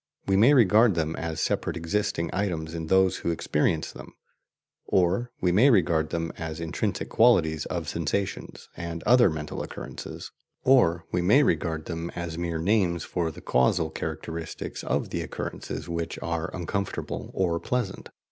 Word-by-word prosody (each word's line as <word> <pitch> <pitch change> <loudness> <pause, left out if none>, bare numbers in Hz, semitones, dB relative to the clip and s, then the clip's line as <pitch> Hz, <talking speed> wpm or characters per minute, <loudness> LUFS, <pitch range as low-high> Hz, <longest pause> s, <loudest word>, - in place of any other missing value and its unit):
We 95 - +2
may 120 +9 +6
regard 110 -2 +5
them 80 -1 -1
as 80 -1 -4
separate - - -1
existing 85 -1 -1
items 85 -5 -2
in 80 -1 -4
those 95 +1 +3
who - - -3
experience 80 -1 0
them, - - -12 0.7
or 95 +7 +1
we 90 - +3
may 110 +10 +6
regard 85 - +3
them 80 -1 -2
as 80 -1 -5
intrinsic 85 -1 -2
qualities 80 -10 +3
of - - -3
sensations 90 +4 -3
and 85 0 -5
other 120 -2 +6
mental 75 -2 -4
occurrences, - - -7 0.3
or 90 -11 +4
we 90 - +1
may 110 +12 +5
regard 80 - 0
them 85 0 -4
as 85 -2 -4
mere 85 -1 -2
names 90 -1 +1
for 85 -3 -2
the 80 - -10
causal 65 0 +2
characteristics 80 0 -5
of - - -1
the - - -2
occurrences - - -5
which 85 -1 -3
are 85 -1 -2
uncomfortable 100 +2 -4
or 85 -3 +1
pleasant. 120 -3 -3
85 Hz, 155 wpm, -26 LUFS, 80-100 Hz, 0.7 s, may